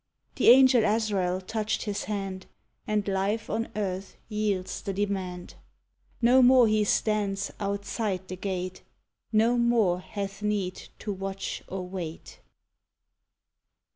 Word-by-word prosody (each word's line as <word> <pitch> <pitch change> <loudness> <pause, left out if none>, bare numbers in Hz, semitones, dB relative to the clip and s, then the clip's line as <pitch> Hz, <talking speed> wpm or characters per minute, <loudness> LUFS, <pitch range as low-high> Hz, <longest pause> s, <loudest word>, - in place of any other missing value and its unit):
The - - +5
Angel 255 -1 +7
Azrael 205 -4 +1
touched 215 +3 -2
his 205 -1 -3
hand, 195 -3 -4 0.4
And 210 -1 0
life 200 +3 -1
on 225 +1 -1
earth 195 -2 -3
yields 210 -4 -1
the 195 - -3
demand; 190 -3 -3 0.7
No 250 +3 +6
more 250 -1 +7
he 215 0 +3
stands 200 -2 0
"outside 200 -1 -2
the 185 - -5
gate," 185 -1 -4 0.5
No 230 +2 +3
more 225 -7 +3
hath 200 +1 -6
need 205 -3 -2
to 205 - -4
watch 195 0 -4
or 185 -1 -5
wait! 175 -4 -7
200 Hz, 120 wpm, -27 LUFS, 190-215 Hz, 0.7 s, Angel